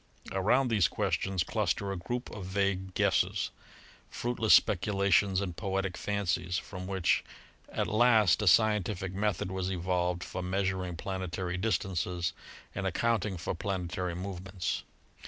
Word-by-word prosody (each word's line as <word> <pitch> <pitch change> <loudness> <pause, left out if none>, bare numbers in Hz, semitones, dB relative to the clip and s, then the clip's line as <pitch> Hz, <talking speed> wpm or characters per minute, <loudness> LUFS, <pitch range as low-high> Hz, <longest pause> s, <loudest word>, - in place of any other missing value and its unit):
Around 120 +7 +2
these 105 -7 +4
questions 95 +1 0
cluster 100 -1 -1
a - - -2
group 120 +8 -4
of 100 -3 -7
vague 95 -1 -1
guesses, - - +1 0.6
fruitless 120 -2 +3
speculations 100 -1 +3
and 95 -4 -3
poetic 95 -2 -2
fancies, 90 -4 -1
from 90 -2 -6
which 95 -3 +1 0.5
at - - -1
last 110 -4 +4
a 105 - 0
scientific 100 -1 +3
method 100 -2 -1
was 95 -1 -2
evolved 90 -1 0
for 90 - -5
measuring 95 -1 -1
plane 95 +1 -4
tary 90 0 -3
distances 90 -4 -1 0.4
and 95 - -2
accounting 110 0 0
for 85 - -3
planetary 90 -1 -3
movements. 90 -1 -3
95 Hz, 130 wpm, -30 LUFS, 90-100 Hz, 0.6 s, these